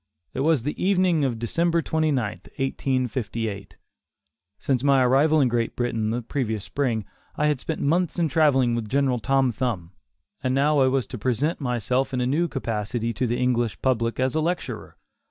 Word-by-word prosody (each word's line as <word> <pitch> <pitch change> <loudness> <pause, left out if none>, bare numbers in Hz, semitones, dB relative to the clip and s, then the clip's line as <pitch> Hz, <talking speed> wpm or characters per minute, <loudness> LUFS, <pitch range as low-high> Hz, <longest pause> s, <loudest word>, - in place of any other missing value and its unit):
It - - -4
was 150 -3 +2
the 150 +5 -3
evening 185 -5 +3
of 125 -4 0
December 165 +8 0
29, 155 -8 +1 0.3
1858. 120 -6 -2 0.8
Since 130 -2 -1
my 135 -2 +4
arrival 145 +5 +4
in 135 - +4
Great 115 -1 -1
Britain 115 -3 -1
the 120 +2 -2
previous 110 -5 -2
spring, 120 -7 -1 0.3
I 150 - 0
had 150 -3 +1
spent 160 +4 -4
months 170 +5 +1
in 170 -2 +2
travelling 135 -5 +3
with 115 -2 -3
General 135 -1 +1
Tom 135 +2 +2
Thumb, 110 -8 -3 0.5
and 130 0 +1
now 145 +2 +3
I 130 - +5
was 130 -1 +1
to 125 - -8
present 130 +8 0
myself 125 +1 -1
in - - -1
a 125 - +1
new 155 +7 +1
capacity 115 -3 -3
to 125 +4 -1
the 120 +1 -1
English 120 -3 0
public 115 -3 0
as 130 0 +1
a 155 - +1
lecturer. 175 +2 -3
130 Hz, 175 wpm, -24 LUFS, 120-145 Hz, 0.8 s, I